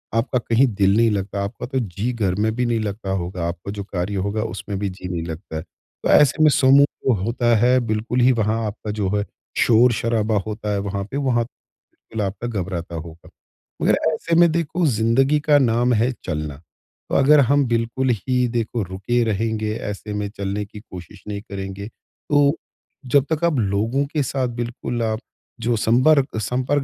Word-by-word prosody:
आपका 125 +2 +1
कहीं 120 +3 +3
दिल 95 0 +3
नहीं 115 -1 +4
लगता, 100 0 -2
आपका 100 - -5
तो 130 +1 -2
जी 105 +1 -2
घर 100 -6 0
में 110 +2 +1
भी 125 +1 0
नहीं 120 -1 +1
लगता 105 -1 -4
होगा, 90 -2 -2
आपका 85 +3 -5
जो 100 0 -5
कार्य 95 0 -3
होगा, 100 +3 -1
उसमें 105 -3 -5
भी 100 0 -1
जी 90 0 -8
नहीं 85 -2 -3
लगता 80 +1 -7
है। - - -3 0.4
तो - - 0
ऐसे 150 +2 +5
में 155 - +7
समूह 140 +1 +6 0.2
जो 130 - +5
होता 120 +2 +2
है 125 +3 +4
बिल्कुल 110 +3 -1
ही 125 +2 +6
वहाँ 110 -1 0
आपका 105 0 -5
जो 105 -2 -1
है 105 - +1 0.3
शोर-शराबा 115 -2 +3
होता 105 -1 -4
है 100 - 0
वहाँ 100 0 -3
पे 140 - -2
वहाँ 130 -4 +1
बिल्कुल 115 -1 -11
आपका 100 +5 -4
घबराता 90 -6 -4
होगा। 80 +1 -9 0.5
मगर - - +4 0.2
ऐसे 165 +2 -1
में 170 -1 +6
देखो 170 +1 0
ज़िंदगी 130 +5 +2
का 150 0 +4
नाम 120 -2 +2
है 120 +3 +2
चलना, 75 -3 -3 0.5
तो - - -1
अगर 145 +2 +6
हम 140 +1 +3
बिल्कुल 115 +3 0
ही 125 +3 0
देखो 115 0 -2
रुके 95 +6 -1
रहेंगे 110 0 -1
ऐसे 105 0 -5
में 105 0 -2
चलने 100 +1 -2
की 105 +1 -11
कोशिश 95 -2 -12
नहीं 100 -1 -4
करेंगे, 100 -1 -6
तो 145 +5 0 0.5
जब 135 +2 +3
तक 160 +1 -3
आप 170 -3 +2
लोगों 110 +7 0
के 150 -3 +1
साथ 130 0 -1
बिल्कुल 120 0 -3
आप 110 -1 -1 0.4
जो 120 +1 +1
संबर्ग 130 +4 +3
संपर्क 130 +6 0
110 Hz, 185 wpm, -21 LUFS, 100-125 Hz, 0.5 s, में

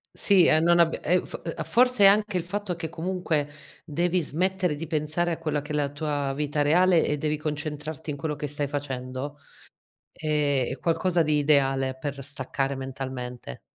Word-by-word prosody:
Sì, 195 -4 +4
e 155 - +6
non 170 +1 +4
abbi 170 -1 +3
e 180 +3 +3
uhm, - - -3
f - - -8
uhm, 165 - -4
forse 250 -3 +3
è - - +11
anche 205 -1 +5
il 175 - -2
fatto 195 +1 -3
che 165 -1 -4
comunque 165 -3 -2 0.3
devi 175 +3 0
smettere 180 +2 0
di 165 +3 -5
pensare 155 +2 -1
a 165 - -3
quella 150 -3 -2
che 150 - -8
è - - -1
la 145 -1 +1
tua 145 -2 -2
vita 150 0 -1
reale 170 +3 +4
e 150 - 0
devi 150 +1 -1
concentrarti 150 0 -4
in 145 - -5
quello 150 -1 -3
che 150 - -5
stai 145 0 -3
facendo; 135 0 -5 0.7
è 145 -4 0
è 130 - -5
qualcosa 175 +1 +2
di 150 -1 +1
ideale 135 -3 +2
per 140 +1 -5
staccare 135 0 -3
mentalmente. 130 - -6
150 Hz, 190 wpm, -26 LUFS, 145-170 Hz, 0.7 s, è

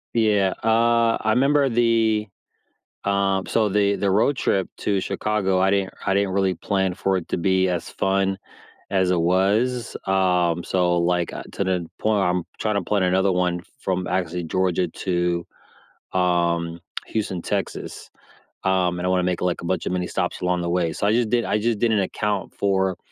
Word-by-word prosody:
Yeah, 105 -4 +3
uh, 115 +1 +3
I 110 0 +1
'member 140 +2 +3
the, 115 -3 +2 0.8
um, 100 -1 +1
so 110 -2 +2
the 100 0 +2
the 100 - 0
road 115 +8 +2
trip 95 -2 0
to 100 -2 0
Chicago, 100 -1 0
I 95 +1 +3
didn't 100 -1 0
I 95 - +2
didn't 100 0 +1
really 95 0 +1
plan 95 +1 -1
for 95 +1 0
it 90 - -6
to - - -1
be 95 +1 +2
as 90 -2 -2
fun 95 0 0 0.5
as 95 -2 +2
it 85 - +1
was. 105 +8 +1
Um, 90 -3 +2
so 90 -2 +1
like, 85 0 0
uh, - - -6
to - - -2
the 90 -3 -1
point 105 -2 +2
I'm 90 0 +1 0.2
trying 105 -1 -1
to 100 - 0
plan 100 +1 0
another 95 +2 +2
one 90 -1 0 0.2
from 90 -1 -2
actually 90 -1 -2
Georgia 90 +1 0
to, 85 0 -1 0.7
um, 85 -2 +1 0.3
Houston, 100 -4 -3
Texas. - - -4 0.5
Um, 90 -2 +1
and 90 - -3
I 90 - +1
wanna 90 -1 +2
make 90 -1 -1
like 90 -1 -1
a - - -7
bunch 90 -1 -1
of - - -1
mini 90 -1 -1
stops - - -2
along 90 -1 0
the 85 - -2
way. 85 -2 0
So 100 - -1
I - - +3
just 115 -1 +1
did 120 0 +2
I - - +1
just 115 -1 0
didn't 110 -2 +2
account 100 +1 -2
for 95 -2 0
95 Hz, 185 wpm, -23 LUFS, 90-105 Hz, 0.8 s, Yeah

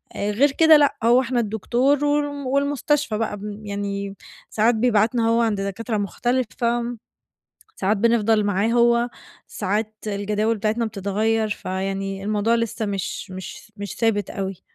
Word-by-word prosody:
آآ 205 +1 -1
غير 275 +7 +3
كده 320 +2 +6
لأ، 290 -1 +3
هو 240 +3 +5
إحنا 245 -1 -1
الدكتور 245 +7 +1
والم 290 -1 -1
والمستشفى 280 -3 0
بقى 215 -2 -2
ب 200 - -11 0.2
يعني 200 -1 -4 0.3
ساعات 225 +2 +2
بيبعتنا 225 0 +2
هو 230 +1 +3
عند 215 -4 0
دكاترة 215 +3 -3
مختلفة، 240 +2 -1 0.8
ساعات 200 +3 +1
بنفضل 225 -1 +3
معاه 205 +1 +1
هو، 235 0 +3 0.4
ساعات 215 +3 -2
الجداول 210 +2 0
بتاعتنا 220 +3 0
بتتغيّر، 215 +1 0
فيعني 195 0 -3
الموضوع 215 +2 +1
لسه 230 -1 -2
مش 195 -1 -4
مش 190 +3 -9
مش 205 0 -6
ثابت 220 -3 +1
أوي. 195 -2 -5
220 Hz, 140 wpm, -22 LUFS, 205-240 Hz, 0.8 s, كده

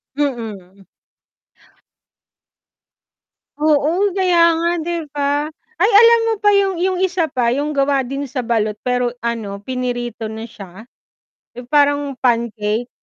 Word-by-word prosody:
Mm. 215 -9 -4 2.7
Oo, 310 +6 +2
kaya 345 -3 +4
nga 335 +1 0 0.2
'di 345 0 -2
ba? 290 +1 -1 0.3
Ay 410 - +5
alam 465 +2 +7
mo - - +2
pa 415 0 +3
yung 390 -2 +2
yung 370 +1 0
isa 370 -2 +1
pa 250 -5 0
yung 290 +4 -1
gawa 275 -1 +1
din 275 +1 -5
sa 255 -3 -4
balot 215 -3 0
pero 250 -1 +1
ano 230 -4 -4
pinirito 245 -3 -4
na 220 +1 -7
siya, 205 -1 -12 0.7
yung 245 - -8
parang 285 -1 +3
pancake. 230 -2 0
275 Hz, 125 wpm, -18 LUFS, 235-330 Hz, 2.7 s, alam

